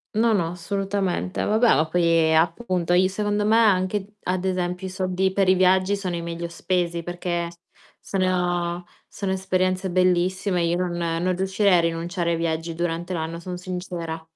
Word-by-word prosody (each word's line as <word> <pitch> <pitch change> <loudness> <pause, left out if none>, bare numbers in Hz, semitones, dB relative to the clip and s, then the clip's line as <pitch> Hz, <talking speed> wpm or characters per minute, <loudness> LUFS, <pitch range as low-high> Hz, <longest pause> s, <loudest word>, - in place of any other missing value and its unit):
No, 225 +1 +3
no, 175 -5 +1
assolutamente. 195 +1 -2
Vabbè, 220 +3 +3
ma 155 - +2
poi, 165 -1 +3
appunto, 175 +2 +1
i 180 +1 +5
secondo 205 +1 -1
me, 215 +1 +4
anche 205 -3 +3
d 205 +2 -21
ad 185 0 -1
esempio, 180 0 -2
i - - -5
soldi 185 0 -1
per 195 0 +1
i 185 - +6
viaggi 185 +1 +3
sono 185 -3 -3
i - - -4
meglio 170 0 -5
spesi 170 0 -1
perché 175 0 -3
s 170 - -16 0.4
sono 180 -2 -1 0.2
sono 195 -1 -4
esperienze 185 0 0
bellissime; 185 0 +1
io 170 +1 +1
non 175 -1 -2 0.3
non 185 0 +1
riuscirei 190 +1 +2
a - - +4
rinunciare 170 +1 -1
ai 170 - +1
viaggi 165 0 -2
durante 170 +1 -2
l'anno, 165 0 -3
son 180 +1 -6
sincera. 180 -3 -5
180 Hz, 170 wpm, -24 LUFS, 170-190 Hz, 0.4 s, i